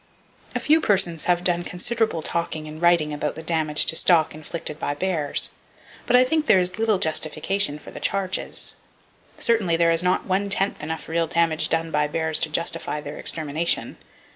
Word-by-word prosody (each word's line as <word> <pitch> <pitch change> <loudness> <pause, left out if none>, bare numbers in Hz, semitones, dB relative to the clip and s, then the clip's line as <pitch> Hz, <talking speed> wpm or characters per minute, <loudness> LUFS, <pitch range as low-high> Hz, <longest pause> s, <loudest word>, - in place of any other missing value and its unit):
A - - +1
few 315 +2 +3
persons 185 - +1
have 175 0 +2
done 175 -1 +2
considerable 215 -1 -1
talking 160 -2 -3
and 155 +1 -9
writing 170 -3 +3
about 150 0 -3
the 160 - -8
damage 160 -2 +1
to - - +2
stock 165 -2 +3
inflicted 155 0 -5
by 145 - -2
bears, 155 -3 +1 0.6
but 245 - +4
I 250 - +7
think 305 +4 0
there - - +6
is 180 +2 0
little 220 -2 +2
justification 155 0 0
for - - -13
such - - -9
charges. 195 -1 -2 0.6
Certainly, 200 -8 +2
there 170 0 +3
is 165 0 +3
not 180 +1 +1
one 195 +2 0
tenth 195 0 0
enough 160 +2 -5
real 165 0 0
damage 165 -1 +1
done 165 0 -1
by 150 -1 +1
bears 160 +1 0
to 165 - -1
justify 165 -1 -2
their 150 - -8
extermination. 160 +1 -1
170 Hz, 180 wpm, -23 LUFS, 155-185 Hz, 0.6 s, I